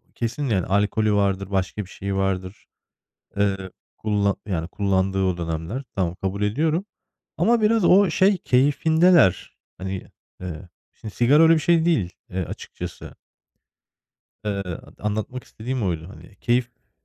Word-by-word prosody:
kesin, 120 +5 -3
yani, 95 -5 +1
alkolü 105 +2 +1
vardır, 100 -1 0
başka 95 +2 -1
bir 95 - -14
şeyi 100 0 -4
vardır. 95 0 -2 0.7
Eee, 95 -2 0 0.3
kullan 105 -2 +1
yani 85 -5 -2
kullandığı 95 -1 0
o 90 -2 0
dönemler. 85 - -4
Tamam, 90 -2 -1
kabul 100 +1 -2
ediyorum 155 - +1 0.5
ama 235 0 +3
biraz 215 -3 +3
o 195 0 +6
şey 190 +3 +4
keyfindeler. 155 - +3 0.2
Hani, 95 +1 -5 0.3
eee, 90 0 -7 0.2
şimdi 110 -2 -9
sigara 145 +7 +5
öyle 165 0 +7
bir 160 - +3
şey 165 +1 +3
değil, 120 - +1 0.2
eee, 90 -1 -3
açıkçası. - - -8 1.3
Iıı, 100 -1 -1
dı 90 -3 -8
anlatmak 110 +4 -3
istediğim 120 +1 -4
oydu 85 -1 -2
hani. 100 0 -14
Keyiften 120 +2 -2
100 Hz, 135 wpm, -23 LUFS, 95-135 Hz, 1.3 s, öyle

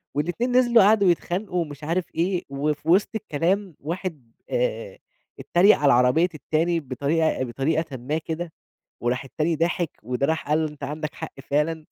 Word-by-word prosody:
والإتنين 175 - -1
نزِلوا 240 -3 +5
قعدوا 200 -2 +5
يتخانقوا 180 +2 -2
ومش 150 -2 -7
عارف 170 +4 0
إيه 180 +2 0
وفي 150 +3 -2
وسْط 190 +4 +4
الكلام 185 0 -1
واحد، 160 -6 -5 0.2
آآ - - -2 0.4
إتّريق 190 +5 +4
على 140 -3 +4
عربية 125 +8 +4
التاني 160 +3 0
بطريقة 145 +2 0
بطريقةً 140 +3 -1
ما 135 +6 -2
كده 160 +1 -4 0.5
وراح 125 +3 -1
التاني 155 +4 -1
ضاحك 165 0 0
وده 125 +4 -1
راح 160 -1 -1
قال 150 +1 +3
له: 155 - -1
"أنت 150 -1 -14
عَندك 150 +2 -4
حق 160 - -7 0.2
فعلًا." 155 +2 0
160 Hz, 155 wpm, -24 LUFS, 145-180 Hz, 0.5 s, نزِلوا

